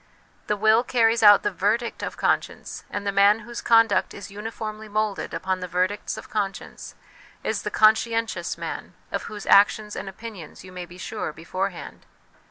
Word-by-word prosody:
The 210 - 0
will 220 +3 +4
carries 230 -2 +2
out 205 -2 +8
the 205 - 0
verdict 210 +6 -1
of - - -5
conscience; - - -1
and 205 0 -4
the 200 - +1
man 200 +2 +4
whose 235 +2 -7
conduct 225 -2 +3
is 200 -1 -9
uniformly 215 +1 -6
moulded 215 -1 -1
upon 185 0 -2
the 180 - -5
verdicts 185 +4 -1
of - - -9
conscience 200 -3 -4 0.5
is - - -1
the - - -3
conscientious 225 +1 +2
man, - - -6 0.2
of - - -3
whose 210 -2 -8
actions 210 +1 +4
and - - -5
opinions 195 -5 -10
you 185 - -12
may 180 -1 -7
be 175 +1 -13
sure 210 -1 -4
beforehand. 180 +3 -5
205 Hz, 170 wpm, -24 LUFS, 195-220 Hz, 0.5 s, out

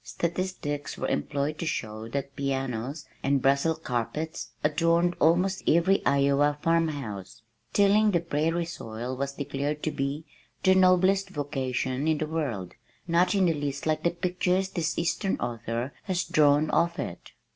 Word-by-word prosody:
Statistics 170 -4 -3
were - - -2
employed 140 - -1
to - - -2
show 110 -5 -3
that 140 +3 -4
pianos 135 0 -3 0.2
and 140 0 +2
Brussels 140 +5 +2
carpets 140 +7 -3
adorned 165 +3 +2
almost 180 +4 +3
every 170 +4 +4
Iowa 140 +1 +3
farmhouse. 145 - -1 0.3
Tilling 205 +1 +4
the 175 -4 +2
prairie 165 +1 0
soil 125 -6 -5
was 140 +1 -3
declared 145 +1 -3
to 155 - 0
be 145 +2 -3 0.4
"the 190 - +6
noblest 190 +1 +4
vocation 135 -3 -2
in 160 -1 +3
the 155 - -1
world, 140 - -3 0.3
not 180 +3 +3
in 195 -2 +4
the 170 - +3
least 145 -2 -3
like 155 -1 +1
the 170 - +2
pictures 180 +2 0
this 170 -3 -2
eastern 190 +3 0
author 120 +2 -3
has 185 -2 0
drawn 150 0 +3
of 170 0 +2
it." 85 - -6
150 Hz, 145 wpm, -27 LUFS, 140-170 Hz, 0.4 s, the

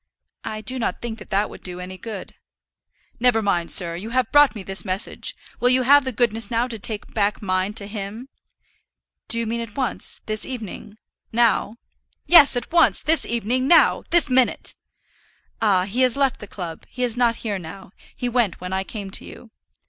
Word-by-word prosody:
"I 215 0 -5
do 255 +3 -2
not 230 - -2
think 230 -2 -6
that - - -12
that 205 +1 +1
would - - -11
do 180 -1 -6
any 180 +1 -7
good." 210 -1 -7 0.9
"Never 245 -2 +4
mind, 180 -5 0
sir; 170 -3 +2
you 195 +6 -6
have 255 -1 0
brought 290 -3 +5
me 205 - -7
his 195 +1 0
message; 190 +1 -1 0.2
will 245 - +3
you 255 0 +3
have 285 +2 +6
the 260 - -1
goodness 230 -1 0
now 235 +1 0
to 225 -2 -6
take 210 +1 -5
back 205 -1 +1
mine 185 0 -1
to 205 - -1
him?" 210 +4 -6 1.0
"Do 230 - +1
you 230 - -1
mean 230 +1 -2
at 230 0 -9
once 260 -3 -1
this 215 -1 -3
evening, 220 -4 -5 0.3
now?" 230 -2 +2 0.5
"Yes, 320 -6 +7
at 245 - -5
once 340 0 +4
this 320 +1 +3
evening, 235 +3 -1
now; 340 - +5
this 345 -2 +4
minute." 255 -1 +1 0.9
"Ah; 195 -4 +3
he 210 +7 -2
has 255 0 +3
left 275 -3 +1
the 210 - -9
club; 175 -5 -7
he 250 - -4
is 240 -2 0
not 240 -2 +2
here 205 -3 -2
now; 175 +2 -10 0.2
he 245 - -3
went 240 -6 0
when 180 +1 -6
I 190 0 0
came 200 -1 -7
to - - -4
you." 230 - -12
225 Hz, 195 wpm, -22 LUFS, 200-250 Hz, 1.0 s, Yes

